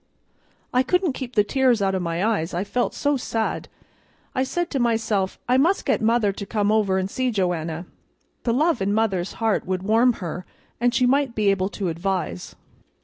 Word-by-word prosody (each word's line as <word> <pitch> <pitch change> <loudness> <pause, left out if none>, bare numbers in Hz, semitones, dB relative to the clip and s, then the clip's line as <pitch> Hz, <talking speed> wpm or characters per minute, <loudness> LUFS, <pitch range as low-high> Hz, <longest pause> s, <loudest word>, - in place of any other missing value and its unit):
I 250 - +4
couldn't 360 +2 +1
keep 255 -2 -6
the 210 - +5
tears 255 +1 +2
out 195 -1 +1
o' 190 - 0
my 170 +2 -1
eyes, 190 -7 0
I 180 - 0
felt 245 +4 -1
so 290 -1 +1
sad. 225 -3 -2 0.7
I 255 - 0
said 345 +6 -2
to 275 - -1
myself, 225 -5 0
I 250 +1 +4
must 335 +9 +2
get - - +1
mother 225 -2 +3
to 200 +1 -7
come 210 0 +1
over 205 -3 +2
an' 190 0 0
see 255 +5 -1
Joanna; 175 -5 -1 0.6
the 235 - 0
love 295 0 +2
in 200 +2 +1
mother's 195 -5 0
heart 225 -5 0
would 185 0 -2
warm 230 +4 +4
her, 180 -3 -6 0.4
an' 245 +1 +3
she 250 +1 +2
might 265 -1 +2
be 210 -2 +3
able 190 0 0
to 195 -3 -3
advise." 170 - -3
215 Hz, 195 wpm, -23 LUFS, 190-250 Hz, 0.7 s, the